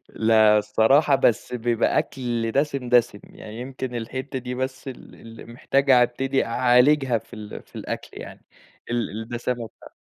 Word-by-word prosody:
لأ، 110 -1 +4
الصراحة 115 +8 +3
بس 120 -3 +1
بييبقى 120 -1 0
أكل 120 -4 -2
دسم، 140 -2 -1
دسم، 120 -4 +2
يعني 110 +2 -11
يمكن 130 0 -6
الحتة 130 +3 -5
دي 125 0 -6
بس 130 +1 -5
ال 130 - -11
اللّي 115 0 -13
محتاج 135 +4 -1
أبتدي 130 +2 +2
أعالجها 125 +2 +3
في 110 +2 -15
ال 105 -1 -9
في - - -17
الأكل - - -6
يعني - - -11 0.5
ال 120 -1 -1
الدَّسَامَة 120 +1 -4
بتاع - - -18
120 Hz, 150 wpm, -23 LUFS, 115-130 Hz, 0.5 s, لأ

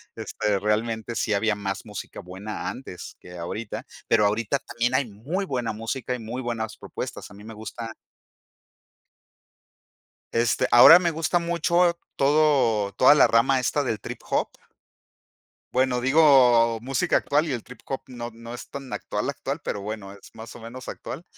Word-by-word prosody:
este, 105 -1 -1
realmente 110 +2 -1
sí 105 - 0
había 110 +2 +1
más 100 -1 -4
música 105 -3 -8
buena 95 +4 -6
antes 125 -9 -9
que 90 0 -12
ahorita 100 +6 -5 0.2
pero 105 -2 +4
ahorita 105 +5 +1
también 120 0 -2
hay 140 - +2
muy 130 - -4
buena 125 -9 -2
música 115 +4 -4
y - - -7
muy 115 +3 -5
buenas 115 -3 -4
propuestas - - -7
a - - -12
mí 105 - -13
me 115 +1 -9
gusta 110 +1 -7 2.4
Este, 115 -1 +2
ahora 155 +8 +10
me 175 -2 +1
gusta 165 +2 0
mucho 170 +1 +2 0.2
todo 135 -8 +3
toda 130 +8 +6
la - - +6
rama 130 +4 +3
esta 145 +3 0
del 110 -5 -2
trip - - -7
hop. - - +1 1.2
Bueno, 130 -1 +2
digo 125 -5 +5
música 125 +1 0
actual 150 +3 +1
y - - -1
el 120 -3 -4
trip 125 - -13
hop 135 - -4
no 120 -2 -7
no 115 +1 -10
es 120 - -9
tan 135 -2 -8
actual - - -3
actual, - - -4
pero 100 - -3
bueno, 100 -1 -6
es 100 - -15
más 115 0 -10
o - - -11
menos 120 +3 -9
actual. 170 - -7
120 Hz, 165 wpm, -25 LUFS, 110-135 Hz, 2.4 s, ahora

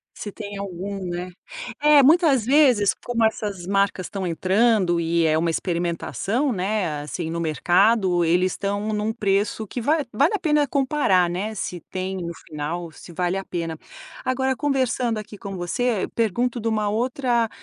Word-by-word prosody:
Se 205 - -6
tem 205 -1 -7
algum, 195 0 -5
né. 175 +1 -4 0.5
É, 295 -1 +7
muitas 295 - +4
vezes, 255 -7 +4
como 235 -2 0
essas 205 -5 -2
marcas 195 -1 +1
estão 195 -2 -4
entrando 185 +1 +2
e 165 0 +1
é 155 0 +3
uma 165 +1 +1
experimentação, 180 - -1
né, 185 -6 -1
assim, 160 +3 -5
no 170 - -3
mercado, 175 - +2
eles 180 +3 +2
estão 200 +1 -2
em 210 -1 -1
um 220 +1 -1
preço 210 0 0
que 240 +4 -5
vale 300 +3 +1
vale 285 - +3
a - - -2
pena 300 -4 +2
comparar, 260 -10 +2
né, 205 +5 -3
se 180 -2 -4
tem 190 0 -3
no 170 -2 -4
final, 160 +3 -4
se 170 - -13
vale 180 +2 -1
a 195 - -5
pena. 165 -2 -4 0.5
Agora, 265 0 0
conversando 255 -5 0
aqui 215 -1 -8
com 195 0 -7
você, 205 +4 -1
pergunto 235 +3 0
de 230 - -3
uma 215 -2 0
outra 240 +1 0
200 Hz, 165 wpm, -23 LUFS, 175-240 Hz, 0.5 s, É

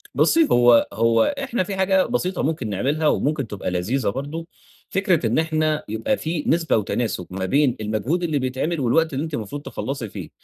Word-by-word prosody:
بصي 330 -2 +4
هو 120 -1 +5
هو 115 +1 +3 0.2
إحنا 240 -7 -1
في 195 +2 -5
حاجة 190 0 +3
بسيطة 190 -7 -1
ممكن 140 -7 -1
نعملها 145 +10 0
وممكن 145 -4 0
تبقى 100 -3 -4
لذيذة 105 +7 0
برضه، 145 - -5 0.4
فكرة 185 -7 +1
إن 115 - +1
إحنا 155 -1 0
يبقى 110 - -1
في 160 -1 -3
نسبة 165 -4 +2
وتناسب 105 -3 -2
ما 95 0 -3
بين 135 +3 +2
المجهود 110 - -1
اللي 155 -4 0
بيتعمل 130 +6 -2
والوقت 155 +6 +2
اللي 135 +3 -1
أنتِ 160 -2 -6
المفروض 145 +4 -4
تخلصي 135 -6 -5
فيه. - - -8
145 Hz, 180 wpm, -22 LUFS, 115-165 Hz, 0.4 s, هو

